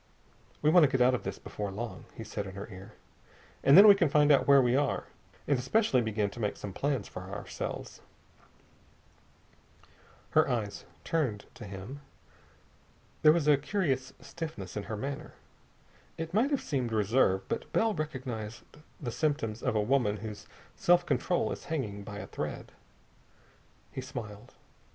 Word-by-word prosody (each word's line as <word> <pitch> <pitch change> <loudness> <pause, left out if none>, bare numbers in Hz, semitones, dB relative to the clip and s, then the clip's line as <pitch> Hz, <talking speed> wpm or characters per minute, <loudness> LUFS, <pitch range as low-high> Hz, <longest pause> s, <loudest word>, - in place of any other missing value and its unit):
"We 150 - +5
want 175 0 +7
to 145 - +5
get 130 - +1
out 125 +1 +5
of 125 - 0
this - - -5
before 105 -1 -5
long," 100 -1 -6
he 115 - -5
said 105 -2 -5
in 95 - -9
her 100 +1 -6
ear, 95 +3 -11 0.7
"and 140 - +7
then 205 +2 +11
we 205 - +11
can 175 -6 +2
find 150 +1 +5
out 140 - +4
where 140 -1 +8
we 125 -1 +3
are, 140 0 +1 0.4
and 140 -3 +2
especially 135 - +2
begin 105 -3 -1
to 120 - -10
make 105 -3 -1
some 100 - -7
plans 135 -2 -1
for - - -8
ourselves." - - -6 2.3
Her 155 -2 +4
eyes 110 -5 -2 0.2
turned 130 -11 -1
to 110 - -10
him. 100 +8 -8 1.2
There 150 - +8
was 155 -2 +1
a 150 -2 +6
curious 140 -5 -1
stiffness 155 - -7
in 105 - -4
her 110 - -3
manner. 135 +5 -5 0.8
It 165 +1 -5
might 230 +7 +3
have 285 -3 0
seemed 130 -5 -2
reserve, 105 -3 +2
but - - -4
Bell 225 -1 +2
recognized 130 - -5 0.4
the 125 -6 -4
symptoms 130 -5 -1
of - - 0
a 105 - +3
woman 110 -2 +2
whose 105 0 -8 0.3
self 175 0 +4
control 175 - 0
is - - -6
hanging 110 -11 -3
by 100 0 -8
a - - -6
thread. - - -5 1.2
He 130 - -5
smiled. 110 -5 -8
130 Hz, 165 wpm, -30 LUFS, 105-150 Hz, 2.3 s, then